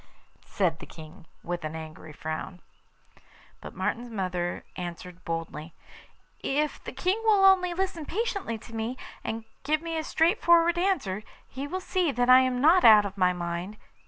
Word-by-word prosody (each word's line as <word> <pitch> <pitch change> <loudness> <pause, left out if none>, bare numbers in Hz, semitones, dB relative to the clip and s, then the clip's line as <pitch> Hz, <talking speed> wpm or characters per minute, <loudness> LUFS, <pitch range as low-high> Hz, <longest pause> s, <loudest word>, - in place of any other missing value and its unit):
said 175 -6 0
the - - -10
King, 160 +2 -13 0.2
with 175 -1 -4
an 155 +1 -4
angry 160 -1 -9
frown. 160 +4 -6 1.0
But - - -10
Martin's 240 +1 -2
mother 180 -5 -3
answered 180 0 -7
boldly: 165 -1 -5 0.6
'If 295 +2 -1
the - - -6
King 365 +11 -1
will 415 -3 +5
only 365 -2 +5
listen 370 -4 -2
patiently 400 - -2
to 230 +1 -14
me, 225 +3 -3 0.3
and 225 0 -4 0.2
give 305 +3 0
me 330 -1 -2
a - - -3
straightforward 340 0 +3
answer, 280 - 0 0.3
he 270 +2 -6
will 370 +5 -3
see 365 -4 0
that 245 +1 +3
I 255 - +10
am 255 -1 +1
not 330 +7 +5
out 215 -2 +8
of 195 -1 -5
my 185 -2 +3
mind. 175 +3 -4
230 Hz, 160 wpm, -27 LUFS, -, 1.0 s, I